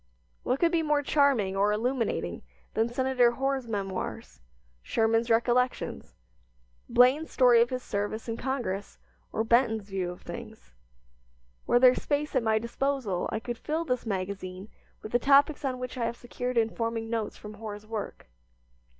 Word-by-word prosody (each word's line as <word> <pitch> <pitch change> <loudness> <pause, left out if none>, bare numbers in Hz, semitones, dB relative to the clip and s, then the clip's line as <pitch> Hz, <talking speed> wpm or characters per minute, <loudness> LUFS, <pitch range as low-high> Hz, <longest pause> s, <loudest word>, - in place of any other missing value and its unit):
What 255 +2 -1
could 340 -1 +3
be 335 -2 +2
more 300 -2 +1
charming 270 -10 +2
or 200 +2 +3
illuminating 235 +3 -1 0.3
than 225 +2 +1
Senator 250 -1 +2
Hoar's 270 0 -1
memoirs, 195 -4 -4 0.4
Sherman's 225 - +1
recollections, 240 +2 0 0.7
Blaine's 260 +6 +4
story 245 -3 +5
of 240 - +3
his 255 -1 -4
service 205 +3 -3
in 230 - -2
Congress, 240 -7 -3 0.3
or 220 - 0
Benton's 225 -2 +2
view 185 -2 -1
of 180 - -9
things? - - -9 0.9
Were - - +4
there 250 0 +7
space 295 +2 -2
at 255 - +4
my 220 -1 +2
disposal 235 -4 -1
I 220 - -1
could 240 +1 -6
fill 320 +2 -2
this 250 -4 -2
magazine 190 0 -4 0.3
with 215 - -7
the 240 - +3
topics 285 +3 +4
on 260 -2 -1
which 250 0 -6
I 235 - 0
have 235 +1 -3
secured 245 0 -4
informing 230 0 0
notes 225 -2 -3
from 210 0 -9
Hoar's 210 -1 -8
work. 215 -1 -6
235 Hz, 155 wpm, -28 LUFS, 215-260 Hz, 0.9 s, there